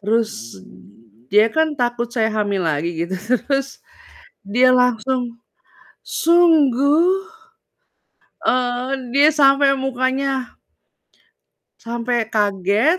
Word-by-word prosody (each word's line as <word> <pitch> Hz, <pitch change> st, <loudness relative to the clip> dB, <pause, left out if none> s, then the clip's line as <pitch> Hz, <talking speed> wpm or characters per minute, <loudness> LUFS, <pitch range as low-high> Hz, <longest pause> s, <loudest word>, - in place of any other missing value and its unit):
Terus, 205 Hz, -, -3 dB, 0.7 s
dia 215 Hz, +2 st, +5 dB
kan 315 Hz, +5 st, 0 dB
takut 240 Hz, -3 st, -2 dB
saya 225 Hz, -2 st, 0 dB
hamil 205 Hz, -3 st, -2 dB
lagi 160 Hz, +1 st, -1 dB
gitu 185 Hz, +2 st, -5 dB
terus 255 Hz, +6 st, -2 dB, 0.6 s
dia 245 Hz, +6 st, +3 dB
langsung, 250 Hz, 0 st, 0 dB, 0.7 s
"Sungguh?" 330 Hz, -, +3 dB, 1.2 s
Eee, 250 Hz, +1 st, 0 dB, 0.2 s
dia 285 Hz, +4 st, +4 dB
sampe 280 Hz, -1 st, +4 dB
mukanya 265 Hz, 0 st, -2 dB, 1.3 s
Sampai 235 Hz, 0 st, -3 dB
kaget 205 Hz, -, +1 dB
250 Hz, 85 wpm, -19 LUFS, 220-275 Hz, 1.3 s, dia